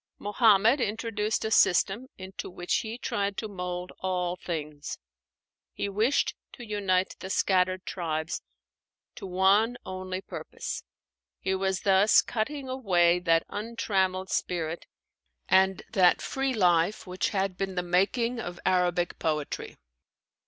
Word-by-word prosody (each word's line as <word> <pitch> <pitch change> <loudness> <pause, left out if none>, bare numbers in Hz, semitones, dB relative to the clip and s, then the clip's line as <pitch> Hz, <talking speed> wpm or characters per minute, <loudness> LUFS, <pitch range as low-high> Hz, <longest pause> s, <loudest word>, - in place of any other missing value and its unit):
Muhammad 215 +4 +4
introduced 220 -1 -1
a 220 - -2
system 205 +4 +3
into 190 0 -7
which 175 -1 -1
he 225 +1 -4
tried 200 -4 -2
to 220 - -3
mold 180 -2 -5
all 180 -1 -1
things. 150 -4 -5 0.8
He 200 - -3
wished 220 +8 +1 0.2
to 240 - -9
unite 195 -3 0
the 190 - -7
scattered 185 -1 +1
tribes 160 -3 -3 0.7
to - - -8
one 195 +6 +3
only 185 0 -4
purpose. - - -6 0.5
He 190 - -1
was 190 0 0
thus 195 +2 +5
cutting 265 +5 -3
away 180 -9 +3
that 165 -2 +2
untrammeled 195 -4 -1
spirit 170 -2 -2 0.6
and 190 0 +3
that 180 -2 +5
free 270 -1 -2
life 180 +2 +2
which 185 0 -1
had 195 -2 -1
been 190 0 -3
the 180 - 0
making 220 +7 +1
of 175 -5 -6
Arabic 180 -1 +1
poetry. 150 -2 -3
190 Hz, 125 wpm, -28 LUFS, 180-215 Hz, 0.8 s, thus